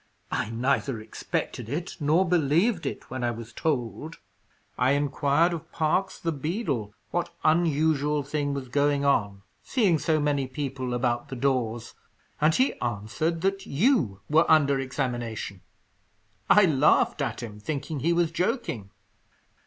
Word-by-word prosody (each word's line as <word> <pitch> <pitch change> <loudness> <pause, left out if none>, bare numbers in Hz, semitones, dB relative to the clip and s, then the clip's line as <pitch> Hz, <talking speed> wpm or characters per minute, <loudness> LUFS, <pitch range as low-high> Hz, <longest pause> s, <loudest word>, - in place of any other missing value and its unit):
"I 110 - -1
neither 125 +1 0
expected 110 +1 -4
it 165 +6 -4
nor 160 +5 +3
believed 170 - +2
it - - -6
when 130 -1 -3
I 120 - +2
was 115 0 -7
told. 150 +2 -2 0.6
I 130 +2 +3
inquired 145 +4 +2
of 165 0 -7
Parkes, 175 +5 0
the 165 - -1
beadle, 145 - -3 0.2
what 175 0 -1
unusual 155 -2 +2
thing 145 0 -2
was 135 -2 -5
going 140 +2 +1
on, 100 -7 +1 0.2
seeing 200 - +2
so 155 0 +1
many 145 -2 0
people 130 -2 -3
about 120 +1 0
the 135 - -5
doors, 120 -3 -1 0.5
and 155 +2 +4
he 260 +2 +3
answered 120 +9 -2
that 195 +1 -1
you 140 - +2
were 155 +3 +3
under 140 -3 +4
examination. 120 -7 -3 0.9
I 200 0 +7
laughed 150 -1 +3
at 135 - -3
him, 105 -3 -8
thinking 145 +5 -4
he 165 +6 +1
was 170 -1 +2
joking." 165 - -2
145 Hz, 140 wpm, -26 LUFS, 125-160 Hz, 0.9 s, I